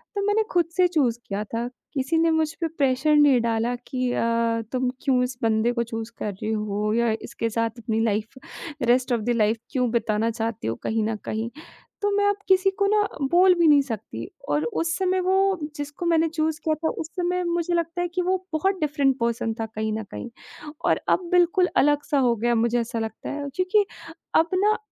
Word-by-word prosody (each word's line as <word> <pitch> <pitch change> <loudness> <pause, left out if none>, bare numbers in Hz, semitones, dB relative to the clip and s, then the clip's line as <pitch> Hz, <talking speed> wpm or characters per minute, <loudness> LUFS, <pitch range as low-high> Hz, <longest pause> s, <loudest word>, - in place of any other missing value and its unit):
तब 400 - -1
मैंने 425 +2 +3
ख़ुद 345 -2 +3
से 365 -1 +5
चूज़ 280 -9 +1
किया 200 +1 -2
था। 230 +3 -3 0.3
किसी 275 +4 0
ने 330 0 +3
मुझ 320 -1 +1
पे 330 - +1
प्रेशर 290 -1 +1
नहीं 285 -4 +6
डाला 230 +1 0
कि 255 -1 -1
अ, 230 -1 +1
तुम 255 -1 0
क्यों 260 -3 +3
इस 250 0 -4
बंदे 225 +1 +2
को 235 -1 0
चूज़ 225 0 -6
कर 210 - -2
रही 215 +3 -4
हो 210 0 -1
या 235 -1 +2
इसके 230 - -3
साथ 230 +1 -2
अपनी 220 0 -1
life 215 +3 -2 0.5
rest 250 +2 +2
of 235 - 0
the 225 - -3
life 220 0 +2
क्यों 250 -2 +1
बिताना 225 -1 +1
चाहती 225 - -3
हो 115 - -1
कहीं 220 0 0
न 220 +1 -1
कहीं। 220 +2 -2 0.5
तो 410 - +2
मैं 405 0 +2
अब 405 - +1
किसी 380 0 +4
को 400 - +3
ना 420 +1 +3 0.3
बोल 365 +2 +6
भी 340 -2 +3
नहीं 290 -2 +6
सकती 220 - -6 0.2
और 145 +1 +1 0.2
उस 335 0 -1
समय 375 -1 +1
वो 380 - +3 0.4
जिसको 290 +3 -5
मैंने 330 -1 +3
चूज़ 315 0 -1
किया 315 - +2
था 320 +1 -1
उस 315 - -5
समय 360 0 0
मुझे 345 0 -1
लगता 335 +1 -1
है 350 - 0
कि 350 +1 -2
वो 365 +1 +1 0.2
बहुत 380 +5 +1
डिफ़रेंट 285 -3 +1
पर्सन 235 -1 -1
था 225 - -1
कहीं 220 0 -3
न 220 +1 -3
कहीं 245 - -6 0.6
और - - +3
अब - - +4
बिल्कुल 360 +1 +4
अलग-सा 290 0 +2
हो 245 -3 +3
गया 235 +2 -1
है - - +2
अब - - +2
मुझे 235 +1 +2
ऐसा 235 0 -3
लगता 220 0 -5
है। 285 0 -4
क्योंकि 370 +3 +2 0.5
अब 325 +1 +4
ना 420 +3 +3
260 Hz, 215 wpm, -24 LUFS, 225-335 Hz, 0.6 s, नहीं